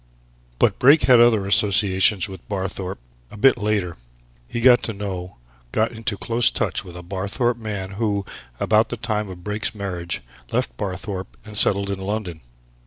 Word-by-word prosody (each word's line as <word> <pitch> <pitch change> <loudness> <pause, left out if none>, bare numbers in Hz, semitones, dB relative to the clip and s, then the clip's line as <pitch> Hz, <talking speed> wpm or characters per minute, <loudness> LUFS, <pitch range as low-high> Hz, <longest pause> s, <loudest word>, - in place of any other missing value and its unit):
"But - - +2
Brake 140 +5 +6
had 125 -3 +6
other 115 -4 +4
associations 100 -1 +4
with 95 -3 -12
Barthorpe 95 -1 -4 0.3
a - - -12
bit 135 +6 +5
later. 105 - -1 0.5
He 120 - -4
got 125 0 +6
to 115 - -3
know 95 -3 -6 0.3
got 110 +1 +1
into 115 -2 -4
close 115 +2 +2
touch - - -2
with 90 -1 -11
a 90 - -9
Barthorpe 100 +7 -1
man 100 -4 -5
who, 100 -1 -1 0.3
about 110 +1 +3
the 120 - -4
time 105 -3 -2
of 90 -1 -10
Brake's 105 +4 -2
marriage, 90 -4 -4 0.3
left - - -1
Barthorpe 95 - -5
and 105 -1 -10
settled 100 -1 +2
in 100 - -4
London. 95 -4 -4
100 Hz, 165 wpm, -22 LUFS, 95-110 Hz, 0.5 s, Brake